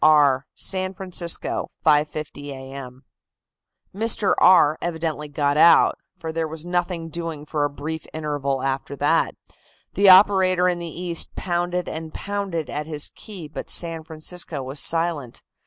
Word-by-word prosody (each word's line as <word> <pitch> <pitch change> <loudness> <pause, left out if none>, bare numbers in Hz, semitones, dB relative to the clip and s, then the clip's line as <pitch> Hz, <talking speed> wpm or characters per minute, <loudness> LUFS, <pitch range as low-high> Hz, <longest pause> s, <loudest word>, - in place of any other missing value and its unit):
"R., 145 -3 +5
San 185 0 -1
Francisco, 180 -2 -2 0.2
5.50 150 -1 +1
A. 130 -1 -8
M." 130 -1 -9 0.9
"Mr. 215 0 +3
R." 170 -5 +6
evidently 160 -3 -3
got 145 0 0
out, 170 +2 +6 0.2
for 160 - -5
there 160 0 -2
was 160 +1 -7
nothing 175 -2 -2
doing 165 -2 -5
for 150 -1 -1
a - - -1
brief 150 +2 -6
interval 145 -4 -2
after 135 +1 -2
that. - - +1 0.6
The 200 +1 +5
operator 185 -1 +6
in 175 -1 0
the 170 - -5
East 170 +1 -3
pounded 175 0 -2
and 160 0 -6
pounded 195 -6 -3
at 150 +1 -4
his 150 -2 -2
key, 190 -7 -9
but 150 - -8
San 165 -2 0
Francisco 160 -2 -5
was 135 +3 -5
silent. 165 -6 0
160 Hz, 145 wpm, -23 LUFS, 145-175 Hz, 0.9 s, R